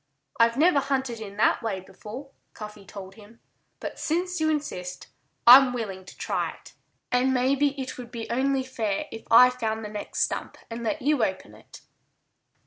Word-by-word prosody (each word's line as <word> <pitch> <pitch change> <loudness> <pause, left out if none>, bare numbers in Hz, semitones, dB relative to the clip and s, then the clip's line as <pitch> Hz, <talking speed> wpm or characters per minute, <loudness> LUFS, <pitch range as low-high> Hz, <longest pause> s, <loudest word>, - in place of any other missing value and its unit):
"I've 230 +1 +4
never 310 0 +5
hunted 265 -4 -2
in 200 -2 -8
that 215 - +3
way 215 -5 -2
before," 210 +8 -10 0.2
Cuffy 210 -2 -9
told 190 0 -9
him. 215 +2 -17 0.4
"But - - -6
since 360 +2 -1
you 315 - +3
insist, 185 -13 -3 0.4
I'm 255 +1 +9
willing 195 -6 -5
to - - -13
try - - -2
it. - - -17 0.4
And 255 +1 +2
maybe 275 +2 +1
it 260 -1 -5
would 240 -2 -8
be 235 -2 -6
only 265 +2 +1
fair 230 0 -2
if 225 - -9
I 250 +2 +8
found 220 -3 -3
the - - -5
next 210 -1 -2
stump - - -3
and 230 +1 -5
let 250 +5 -2
you 290 -4 +2
open 190 -3 -3
it." - - -15
240 Hz, 175 wpm, -26 LUFS, 210-270 Hz, 0.4 s, I'm